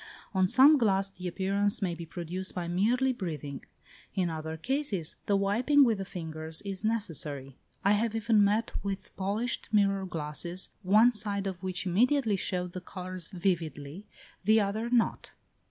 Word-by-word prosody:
On 190 -1 +3
some 275 +8 +7
glass 195 -4 +2
the 185 -1 -7
appearance 200 +3 0
may 180 -3 -1
be 170 0 -7
produced 175 +3 -4
by 175 -2 -3
merely 240 +9 +2
breathing; 150 - -5 0.5
in 180 -4 +1
other 160 0 -5
cases 220 - -2
the 200 - +3
wiping 235 +9 +4
with 225 -6 +2
the 195 - -3
fingers 160 -2 -5
is 195 -1 -3
necessary: 155 - -2 0.3
I 200 - +5
have 220 +2 +1
even 225 -1 +3
met 210 +3 +1
with 195 -1 -5
polished 205 +6 -1
mirror 195 -2 +2
glasses, 170 +2 -5
one 215 +5 +5
side 205 -3 -2
of 185 -2 -4
which 185 0 -3
immediately 225 +4 +2
showed 180 -1 -2
the 185 - -6
colours 185 -2 -6
vividly; 170 -2 -3 0.4
the 215 +3 +5
other 215 +3 -1
not. 240 -2 +1
195 Hz, 155 wpm, -29 LUFS, 175-215 Hz, 0.5 s, some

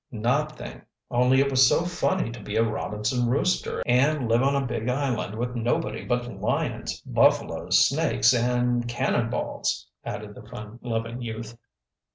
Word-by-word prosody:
"Nothing, 140 +6 -2 0.3
only 125 +2 +4
it 140 0 +1
was 130 -1 +6
so 170 - +2
funny 180 -5 0
to 120 - -9
be 105 +1 -6
a 115 - +4
Robinson 110 +2 -1
Rooster 165 +9 0
and 130 +2 +2
live 115 +1 +3
on 140 +1 +2
a 140 -1 0
big 120 -1 -2
island 125 -6 -1
with 120 +1 -2
nobody 115 -2 -1
but 120 -1 -1
lions, - - -2
buffaloes, - - +3
snakes, 120 - +3
and 120 0 +1
'cannonballs,'" 120 0 -1 0.2
added - - -6
the - - -11
fun 105 +2 -9
loving 115 0 -3
youth. 115 0 -6
120 Hz, 150 wpm, -25 LUFS, 115-130 Hz, 0.3 s, was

